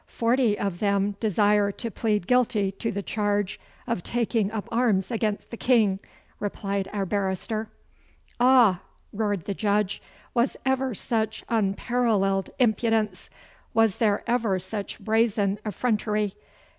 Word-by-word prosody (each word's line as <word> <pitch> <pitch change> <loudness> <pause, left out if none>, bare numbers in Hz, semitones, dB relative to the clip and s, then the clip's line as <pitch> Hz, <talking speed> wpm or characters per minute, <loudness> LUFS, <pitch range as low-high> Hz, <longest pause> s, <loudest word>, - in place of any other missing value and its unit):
'Forty 235 -2 +1
of 195 -4 -2
them 200 0 +1
desire 210 -1 +3
to 230 +2 -5
plead 210 -5 0
guilty 220 -5 +2
to 225 +4 -3
the 200 -1 -4
charge 205 -2 -1 0.3
of 230 -7 -2
taking 225 -1 0
up 220 -2 -4
arms 220 -5 +1
against 215 -3 -2
the 235 - -6
King,' 220 -7 +3 0.4
replied 200 -1 -2
our 200 -2 -1
barrister. 200 +3 -2 0.7
'Ah!' 245 -7 +5 0.3
roared 205 -5 -1
the 200 - -2
Judge. 205 -1 0 0.3
'Was 240 +2 +1
ever 265 -2 +1
such 220 0 -2
unparalleled 205 -2 +1
impudence? 220 -4 +1 0.5
Was 225 -3 +3
there 210 -3 +1
ever 230 -5 +1
such 200 +2 -5
brazen 215 -3 +1
effrontery? 210 -1 0
210 Hz, 125 wpm, -26 LUFS, 200-230 Hz, 0.7 s, Ah